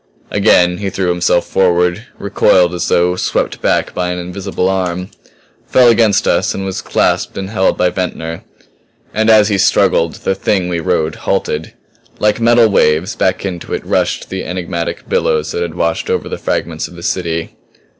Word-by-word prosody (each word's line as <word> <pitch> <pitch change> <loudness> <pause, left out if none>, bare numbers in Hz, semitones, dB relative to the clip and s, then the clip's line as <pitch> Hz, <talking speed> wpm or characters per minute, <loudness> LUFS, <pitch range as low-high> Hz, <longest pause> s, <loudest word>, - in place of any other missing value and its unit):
Again 90 -3 +3
he 100 -1 -2
threw 95 -1 -2
himself 90 0 +1
forward; 90 +4 +1
recoiled 90 -3 +2
as 90 - -2
though 90 +1 +2
swept 90 - -2
back - - 0
by 90 -1 -2
an 90 - -3
invisible 90 +1 -3
arm; 90 -1 -2 0.6
fell 125 -2 +5
against 115 -3 +3
us - - +1
and 95 - -4
was 95 -1 -4
clasped - - 0
and 95 +1 -5
held 95 -3 +1
by 90 0 +2
Ventnor. 85 -3 -4 0.7
And 110 +1 +1
as 110 -1 +5
he 100 -2 0
struggled 85 -2 +2
the - - -1
Thing 95 -1 -1
we 85 -1 -1
rode 80 -2 0
halted. 75 +1 -2 0.4
Like 105 +1 +1
metal 115 0 +5
waves 90 -1 +2
back 95 +1 0
into 90 -3 -4
it - - -7
rushed - - -1
the 95 0 -3
enigmatic 85 -2 -4
billows 75 -1 0
that - - -3
had 85 -2 -3
washed 85 -1 -1
over - - -1
the - - -5
fragments 80 -1 -2
of 90 - -14
the 85 - -10
city. 85 -3 -2
90 Hz, 175 wpm, -15 LUFS, 85-100 Hz, 0.7 s, fell